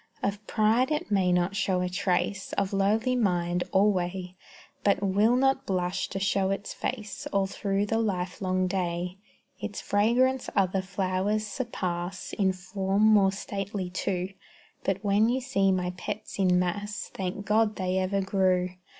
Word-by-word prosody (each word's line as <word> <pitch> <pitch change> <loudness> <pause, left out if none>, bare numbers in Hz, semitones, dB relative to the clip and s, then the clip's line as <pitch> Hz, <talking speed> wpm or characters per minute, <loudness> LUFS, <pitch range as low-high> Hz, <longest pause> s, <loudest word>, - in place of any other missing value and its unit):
Of 200 +1 -1
pride 225 +4 +3
it 300 -7 -2
may 190 -3 +3
not 180 +2 +1
show 190 -3 +1
a 180 - 0
trace; 190 +1 -1
Of 200 0 -1
lowly 215 +6 +2
mind, 180 -6 +1
alway; 185 -2 +1 0.5
But 200 -1 +2
will 205 +5 +3
not 270 +1 +2
blush 180 -1 -1
to 195 - -3
show 195 0 +1
its 195 +1 -3
face 215 -5 -4
All 195 -1 +2
through 195 +1 -1
the 225 +2 0
lifelong 185 -2 -1
day: 180 0 -2 0.4
Its - - -5
fragrance 245 +5 +2
other 190 -1 +2
flowers 190 +2 -1
surpass, 185 -6 -4
In 195 -2 +2
form 190 +2 -1
more 210 -3 +6
stately, 195 -1 -4
too. 180 0 -2 0.5
But 195 +1 -1
when 205 +2 +3
you 255 +2 +1
see 195 -7 +1
my 180 -1 0
pets 200 +3 -6
in 180 -2 +4
mass, 205 +4 -2
Thank 190 +1 -4
God 215 0 +2
they 185 0 0
ever 195 +1 0
grew. 185 -2 +2
195 Hz, 150 wpm, -28 LUFS, 185-210 Hz, 0.5 s, more